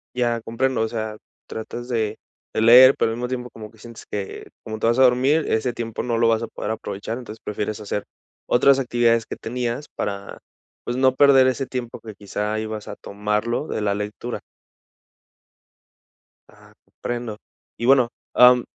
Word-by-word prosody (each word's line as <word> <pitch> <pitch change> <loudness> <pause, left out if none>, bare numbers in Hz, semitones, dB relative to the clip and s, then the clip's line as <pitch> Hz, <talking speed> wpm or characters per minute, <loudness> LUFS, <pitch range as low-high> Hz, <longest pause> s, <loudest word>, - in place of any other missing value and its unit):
Ya 120 -2 0
comprendo, 115 +2 -1
o 110 - +1
sea, 110 -1 -4 0.3
tratas 120 +2 -6
de 110 -3 -1 0.3
de - - -1
leer, 125 +4 +9
pero 115 - +1
al 115 - -4
mismo 125 +1 -2
tiempo 125 -1 -4
como 110 -1 -10
que 110 - -21
sientes 115 +1 -12
que, 100 -2 -5 0.2
como 110 0 -6
te 115 - +1
vas 115 +1 +2
a 130 - +6
dormir, 130 +5 +4
ese 110 +3 +1
tiempo 115 -2 -4
no 120 -2 -1
lo 115 0 +3
vas 115 0 +2
a 115 - -3
poder - - -5
aprovechar, 110 +1 -5
entonces 110 -3 -9
prefieres 105 +1 -3
hacer 105 -1 -4 0.4
otras 135 +2 +5
actividades 120 -3 +2
que - - -5
tenías 120 +4 -3
para, 100 -1 -4 0.4
pues, 120 - -3
no 130 0 +4
perder 135 -1 +6
ese 130 +1 0
tiempo 125 -2 -5
que 110 -2 -10
quizá 105 +2 -3
ibas 110 -1 -5
a - - -6
tomarlo 105 +7 -2
de - - -3
la 100 -1 +1
lectura. 105 +4 -4 2.1
Ah, - - -20
comprendo 120 -3 -5 0.4
y 120 - -3
bueno, 130 -2 +5 0.2
am, 125 0 +7
115 Hz, 175 wpm, -22 LUFS, 110-125 Hz, 2.1 s, leer